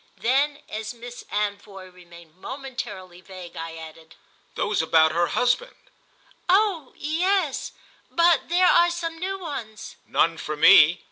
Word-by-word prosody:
Then 285 +4 0
as 220 +2 -6
Miss 240 +1 -10
Anvoy 200 -2 -4
remained 170 -2 -16
momentarily 205 -6 -8
vague 185 -2 -11
I 165 0 -6
added: 160 0 -12 0.4
"Those - - 0
about 160 -1 +4
her 170 +2 +1
husband." 250 - 0 0.7
"Oh 375 -7 +2
yes, 335 0 -1 0.4
but 340 -1 +2
there 360 +2 +3
are 345 -1 +5
some 335 -1 -5
new 385 +2 -3
ones." 270 - -8
"None 165 -1 +1
for 155 0 -5
me. 165 +2 +7
225 Hz, 130 wpm, -24 LUFS, -, 0.7 s, me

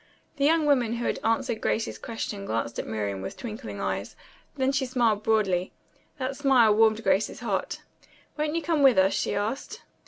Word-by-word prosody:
The 280 - +2
young 320 +1 +3
woman 250 -6 +2
who 235 0 -3
had - - -1
answered 225 0 0
Grace's 220 - -1
question 215 -3 -5
glanced 115 - -2
at - - -4
Miriam 100 -3 -3
with 95 - -6
twinkling 230 0 -7
eyes. - - -3 0.4
Then 265 0 +2
she 270 -1 0
smiled 235 -5 +1
broadly. 200 -5 +1 0.4
That 265 0 -3
smile 265 -6 +4
warmed 220 +1 +3
Grace's 215 +6 +1
heart. 205 -5 -3 0.5
"Won't 300 +1 -1
you 335 - -1
come 325 -3 +1
with 270 -5 +6
us?" 190 +1 +4
she - - -1
asked. 210 +7 -3
230 Hz, 180 wpm, -26 LUFS, 205-270 Hz, 0.5 s, with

